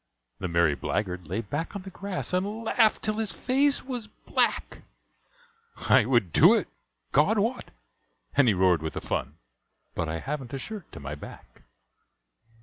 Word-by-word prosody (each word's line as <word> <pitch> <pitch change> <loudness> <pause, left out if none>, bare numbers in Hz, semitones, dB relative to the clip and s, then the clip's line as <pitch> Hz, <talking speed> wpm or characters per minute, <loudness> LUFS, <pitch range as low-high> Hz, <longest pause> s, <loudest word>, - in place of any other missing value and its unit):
The 95 - -2
merry 85 -3 +3
blackguard 90 +2 -3
lay 95 +7 -2
back 145 - -4
on 200 - -5
the 190 - -9
grass, 195 -1 -4
And 205 +5 -1
laughed 225 -1 +3
till 215 0 -1
his 220 -3 -1
face 275 +2 +1
was 245 -5 -3
black; 210 - -1 1.0
"I 110 - +4
would 120 -9 +2
do - - +7
it, - - 0 0.4
God 175 +11 +4
wot," 230 +5 -1 0.7
and 140 -3 +5
he 105 - +4
roared 90 -3 +3
with 80 0 -4
the - - -3
fun, 70 +3 -3 0.6
"But 85 -2 -2
I 80 - -2
haven't 135 - -5
a - - -2
shirt 205 +5 -8
to - - -8
my 70 +1 -6
back." 75 - -12
145 Hz, 165 wpm, -27 LUFS, -, 1.0 s, do